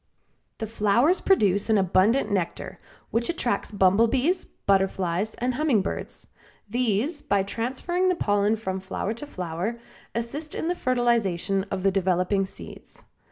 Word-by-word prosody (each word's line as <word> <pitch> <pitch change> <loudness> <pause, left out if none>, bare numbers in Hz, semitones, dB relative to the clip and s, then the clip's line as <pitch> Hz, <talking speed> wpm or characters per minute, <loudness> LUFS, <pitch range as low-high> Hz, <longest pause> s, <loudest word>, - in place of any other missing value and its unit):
The 220 - -3
flowers 230 - +2
produce 205 - +2
an 220 - +4
abundant 200 +5 +3
nectar, 185 -4 -3 0.3
which 235 +1 0
attracts 245 -11 -1
bumblebees, 230 - +2
butterflies 195 0 0
and 250 +1 -1
humming 260 -7 +2
birds; - - -5 0.4
these 245 - 0
by 200 -1 +1
transferring 260 - -1
the 365 - +2
pollen 205 -5 +2
from 190 -4 -4
flower 190 +2 -3
to 260 +6 -8
flower 180 - -4 0.4
assist 280 +7 -4
in 325 - -2
the - - +2
fertilization 220 - +1
of 185 - -3
the 195 - +4
developing 190 +1 +1
seeds. - - -12
215 Hz, 135 wpm, -25 LUFS, 195-250 Hz, 0.4 s, an